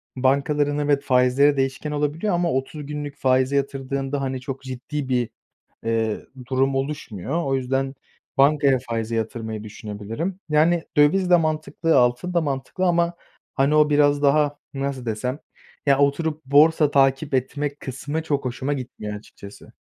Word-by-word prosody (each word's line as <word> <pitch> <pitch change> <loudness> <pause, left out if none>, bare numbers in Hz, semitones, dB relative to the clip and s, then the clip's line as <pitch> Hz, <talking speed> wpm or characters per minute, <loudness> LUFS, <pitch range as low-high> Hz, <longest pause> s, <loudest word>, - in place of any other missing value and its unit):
bankaların 140 +2 +1
evet 145 -1 +1
faizleri 130 +3 +3
değişken 135 +3 -1
olabiliyor 150 +7 -1
ama 175 0 +1
30 135 +3 -3
günlük 145 0 -6
faize 130 +1 +2
yatırdığında, 135 0 -2
hani, 130 -1 -3
çok 135 +1 -6
ciddi 130 +2 -5
bir, 125 -2 +1 0.6
eee, 115 -1 -1 0.2
durum 135 +1 +1
oluşmuyor. 135 - -3
O 135 -1 +1
yüzden 135 +1 -1 0.4
bankaya 140 -1 +4
faize 115 0 -2
yatırmayı 110 -1 -3
düşünebilirim. 110 - -5
Yani, 160 +3 +3
döviz 180 +6 +4
de 180 - +7
mantıklı, 160 +1 0
altın 125 +9 +1
da 170 - +3
mantıklı 145 +5 -2
ama, 170 -1 +2 0.4
hani, 140 +3 +3
o 150 0 +5
biraz 145 -1 +3
daha, 145 0 +3 0.2
nasıl 135 -2 -3
desem, 125 +5 -2 0.5
ya 140 -1 +4
oturup 150 +2 0
borsa 150 +2 +5
takip 135 +1 +2
etme 140 +3 -1
kısmı 145 +3 -5
çok 145 -3 -1
hoşuma 130 +3 -2
gitmiyor 125 -6 -6
açıkçası. 100 -1 -13
140 Hz, 140 wpm, -23 LUFS, 130-150 Hz, 0.6 s, de